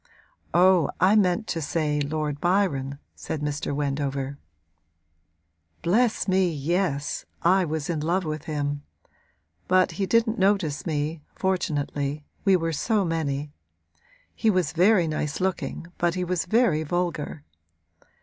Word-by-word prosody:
'Oh, 180 -2 +5
I 195 +3 +5
meant 200 +1 +3
to 165 - -1
say 150 -1 0
Lord 150 0 -2
Byron,' 155 -8 +1 0.2
said 155 - -5
Mr. 150 0 -2
Wendover. 140 -1 -2 1.4
'Bless 220 +6 +2
me, 185 -2 +3
yes; 155 -1 -1 0.2
I 185 +2 +4
was 155 -2 -3
in 165 -3 -1
love 175 +4 0
with 155 0 -4
him. 145 -2 -2 0.9
But 185 0 +4
he 195 - +1
didn't 230 +1 +2
notice 190 -6 +1
me, 150 0 -2
fortunately 145 -5 -1 0.2
we 195 -2 +5
were 165 -2 0
so 210 +6 +1
many. 150 -3 -2 0.8
He 225 - +1
was 185 -6 +2
very 180 +1 +4
nice 150 -1 -2
looking 185 -2 -2
but 170 0 +1
he 180 - -1
was 180 -1 -1
very 200 -5 +3
vulgar.' 160 -2 -2
165 Hz, 130 wpm, -25 LUFS, 145-185 Hz, 1.4 s, Oh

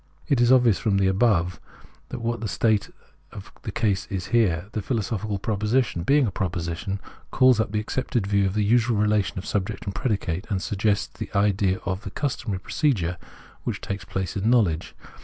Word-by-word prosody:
It 140 -6 +2
is 120 +1 +5
obvious 120 -6 +5
from 105 -4 +1
the 95 - +3
above 95 -3 +2 0.5
what 115 0 -2
is - - -13
the 110 - -2
state 110 -1 +1 0.4
of - - -10
the - - -5
case 100 -4 0
here. 95 -2 0
The 110 - -3
philo 115 +2 -1
sophical 105 0 -3
proposition, 110 -1 0
being 140 +9 +3
a 105 - -1
proposition, 90 +1 -3 0.3
calls 130 -3 +5
up 110 - +2
the 105 0 -1
Preface - - -6
63 130 - 0 0.2
accepted - - -5
view 100 -1 +3
of 95 - -3
the 105 - +2
usual 115 +1 +3
relation 105 -2 +1
of 95 - -4
subject 100 0 -2
and 100 - -3
predicate, 100 -6 -2
and 100 -3 0
suggests 105 +1 -1
the - - -4
idea 100 -1 +2
of 95 0 -2
the - - -6
customary 120 -8 -3
pro - - -12
cedure 95 - +1 0.5
which - - -3
takes 100 0 -5
place 95 -3 -4
in 105 +3 +1
knowledge. 100 -10 +2
105 Hz, 195 wpm, -25 LUFS, 95-115 Hz, 0.5 s, is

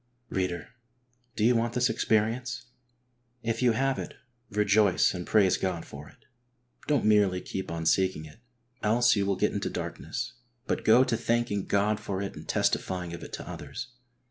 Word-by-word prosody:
Reader, 90 -3 -2 0.7
do 105 - -1
you 120 +1 +5
want 115 0 0
this 125 0 +3
experience? 115 +3 0 0.8
If 115 +1 -1
you 125 -2 +4
have 135 +3 0
it, - - -6 0.3
rejoice 105 -2 +3
and 90 -2 -5
praise 100 -4 +4
God 90 -3 -2
for 70 +1 -10
it. - - -23 0.6
Don't 145 -7 +2
merely 105 -4 +4
keep 95 +1 -5
on 80 -1 -4
seeking 90 -2 +2
it, 75 +6 -14 0.4
else 120 +3 +4
you 100 -1 0
will 100 - +2
get - - +1
into - - -2
darkness, 120 - -5 0.3
but - - -1
go 115 +4 +6
to 120 - 0
thanking 115 -3 0
God 105 +1 +2
for 95 -2 -4
it 100 0 -4
and - - -10
testifying 90 -2 0
of 85 - -7
it - - -9
to - - -6
others. - - -7
105 Hz, 170 wpm, -28 LUFS, 95-115 Hz, 0.8 s, go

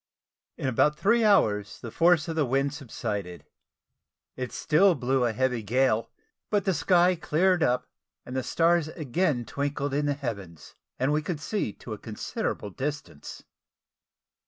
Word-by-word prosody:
In - - -3
about 150 +4 +2
three 230 +3 +3
hours 105 - +2
the 115 - -8
force 170 +1 +3
of 165 - -3
the 155 - +2
wind 135 +2 0
subsided. 105 - -5 0.9
It 125 -1 -5
still 180 +4 +3
blew 130 -1 +1
a 120 - +1
heavy 125 +1 0
gale; 115 0 +1 0.4
but 205 -2 +1
the 190 - +2
sky 180 +2 +4
cleared 175 +2 +1
up, 125 -3 +1 0.4
the 130 +1 -3
stars 165 +3 +2
again 155 -4 -1
twinkled 140 +1 -3
in 145 +1 0
the 145 - +1
heavens, 100 - -7 0.2
and 135 +3 +1
we 150 - +1
could 160 -1 -4
see 175 - -2
to 110 - -8
a 105 - -7
considerable 105 -1 -4
distance. 140 - -6
140 Hz, 150 wpm, -27 LUFS, 120-165 Hz, 0.9 s, sky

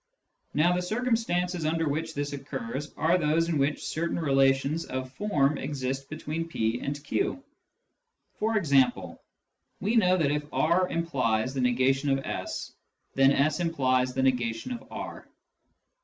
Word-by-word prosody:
Now, 170 +4 +4
the 180 - 0
circumstances 180 -5 0
under 165 +1 0
which 160 +2 -2
this 145 0 -2
occurs 135 0 -5
are 170 +4 +3
those 165 +1 +2
in 160 -4 +1
which 140 +2 0
certain 170 +2 -2
relations 135 0 +2
of 130 0 -5
form 150 -9 +1
exist 135 -1 -3
between 155 +1 -4
p 115 -6 -1
and 145 0 -4
q. 275 - -1 1.0
For 220 +1 +1
example, 140 -9 +2 0.6
we 215 +4 0
know 185 -5 +4
that 150 -5 +2
if 150 0 -3
r 180 +3 +2
implies 130 -8 0
the 135 - -1
negation 130 +3 +2
of 135 0 0
s, - - -4 0.4
then 135 0 +5
s 145 +3 +2
implies 130 -7 +1
the 135 - +1
negation 120 - 0
of 240 - -6
r. - - -7
150 Hz, 145 wpm, -28 LUFS, 135-170 Hz, 1.0 s, then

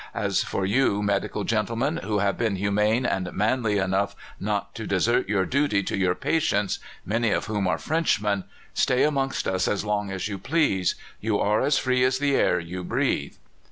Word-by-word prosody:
As - - +1
for 95 - -2
you, 105 -1 +2
medical 100 0 -1
gentlemen, 115 - 0
who 105 -9 -2
have 100 -1 +1
been 110 -4 0
humane 105 +5 +1
and 90 -6 -1
manly 105 0 +1
enough 100 +1 0 0.2
not 100 0 -2
to 110 - -6
desert 105 +4 +1
your 95 -3 +2
duty 135 -6 +1
to - - -2
your 90 -2 +1
patients 105 -11 0 0.3
(many 115 +3 +1
of - - 0
whom 105 -3 -1
are 80 -2 +1
Frenchmen), 105 - 0 0.3
stay 125 - +2
amongst 135 -3 0
us 95 -1 0
as 105 0 -1
long 105 -1 -1
as 95 0 -3
you 100 -2 -5
please. 115 - +1 0.2
You 110 -1 0
are 105 +1 +2
as 140 +1 +2
free 125 -1 +2
as 130 0 +2
the 140 0 +1
air 90 - +3
you 90 +2 -6
breathe." - - -1
105 Hz, 185 wpm, -25 LUFS, 100-125 Hz, 0.3 s, air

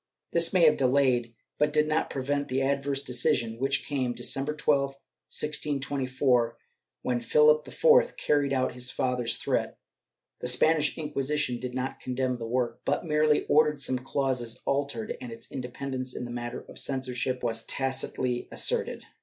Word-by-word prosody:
This 170 0 +4
may 180 -2 +3
have 155 -2 +6
delayed 125 -3 +2 0.2
but 150 0 +3
did 150 0 +2
not 155 +1 0
prevent 140 +2 -2
the 130 +1 0
adverse 140 0 -1
decision, 120 -3 0
which 135 +1 0
came 130 -4 -1
December 140 +3 0
12, 140 -2 +1 0.3
1624, 135 -5 0 0.5
when 125 -1 0
Philip 150 +5 +4
IV - - +4
carried 145 -2 +1
out 130 -1 +1
his 125 0 -2
father's 125 -2 -1
threat. - - -1 0.6
The - - -3
Spanish 150 +5 +3
Inquisition 150 -4 -1
did 125 0 -5
not 130 +1 -3
condemn 125 -1 -2
the 115 - -5
work, 125 0 -1
but - - -1
merely 150 -1 +2
ordered 150 0 +3
some 130 -2 +1
clauses 130 -3 -2
altered, 140 -5 -1
and 125 - -7
its 115 - -9
independence 130 0 -5
in 125 - -4
the 120 - -7
matter 120 0 -5
of - - -8
censorship 130 -1 -2
was 115 -1 -1
tacitly 130 -2 -1
asserted. - - 0
135 Hz, 155 wpm, -28 LUFS, 125-145 Hz, 0.6 s, have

